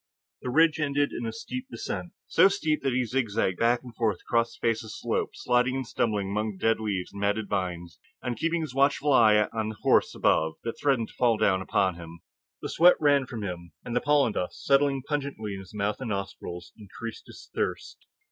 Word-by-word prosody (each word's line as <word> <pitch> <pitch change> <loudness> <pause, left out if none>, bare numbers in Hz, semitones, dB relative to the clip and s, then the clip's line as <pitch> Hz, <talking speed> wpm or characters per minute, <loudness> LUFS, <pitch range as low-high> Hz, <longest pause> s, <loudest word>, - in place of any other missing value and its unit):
The - - -4
ridge 160 +3 +4
ended 145 -1 +1
in 120 - -4
a - - -2
steep 255 - -6
descent 175 -7 -5
so 180 +4 +5
steep 160 -6 0
that 135 - 0
he 125 0 +1
zigzagged 110 -6 -1
back 120 +2 +2
and 120 -3 -11
forth 110 -5 +1
across 115 0 0
the - - -1
face 115 0 +1
of - - -10
the - - -10
slope, - - -2
sliding 125 +1 +1
and 135 -1 -2
stumbling 105 -5 -1
among 105 +1 -1
the - - -14
dead 115 +3 +2
leaves 100 -5 -3
and 100 - -7
matted 105 +1 0
vines 85 -4 -3 0.2
and 125 -1 -3
keeping 165 +6 0
a - - -3
watchful 140 +1 +3
eye 105 -4 +6
on 110 -1 -1
the 110 - -6
horse - - +3
above 80 0 +2
that 115 - -5
threatened 135 -6 +1
to - - -16
fall 120 -3 +2
down 95 -3 +2
upon 95 -1 +1
him. 85 0 -11 0.4
The - - -3
sweat 175 +2 +6
ran 145 -3 +3
from 115 -4 -6
him, 85 -4 -6
and 120 - -4
the 125 - +2
pollen 145 -6 +3
dust, 90 - -4
settling 140 -1 +3
pungently 140 -8 -3
in 95 0 -7
mouth 105 0 -1
and 125 - -4
nostrils, 90 -3 -5
increased 110 +2 -8
his - - -13
thirst. - - -4
115 Hz, 215 wpm, -27 LUFS, 100-140 Hz, 0.4 s, eye